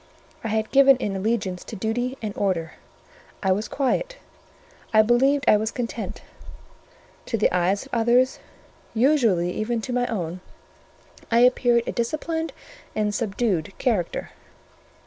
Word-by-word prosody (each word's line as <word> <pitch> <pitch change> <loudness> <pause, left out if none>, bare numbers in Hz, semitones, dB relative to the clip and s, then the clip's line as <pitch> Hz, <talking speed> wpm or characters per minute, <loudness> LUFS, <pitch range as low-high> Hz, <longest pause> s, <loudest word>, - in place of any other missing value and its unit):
I - - -2
had 220 0 -1
given 275 -1 +6
in 205 -6 -3
allegiance 195 -2 -1
to - - -7
duty 245 +5 -2
and 210 -2 -4
order; 175 -5 -1 0.7
I 190 - +2
was 205 +4 0
quiet; - - -1 0.7
I 215 -1 +6
believed 265 +5 +3
I 210 - +7
was 215 +1 -1
content: 235 -1 -5 1.0
to 225 - -1
the 210 - +2
eyes 185 +6 +1
of 270 - -18
others, 240 +2 +3 0.6
usually 225 - +3
even 225 +4 -2
to 245 - -4
my 245 0 +1
own, 180 -4 -4 0.9
I 230 +1 +4
appeared 245 -1 +4
a - - -2
disciplined 320 +6 -2 0.4
and 210 -1 0
subdued 200 -5 -1
character. 220 -10 -1
225 Hz, 135 wpm, -24 LUFS, 200-250 Hz, 1.0 s, I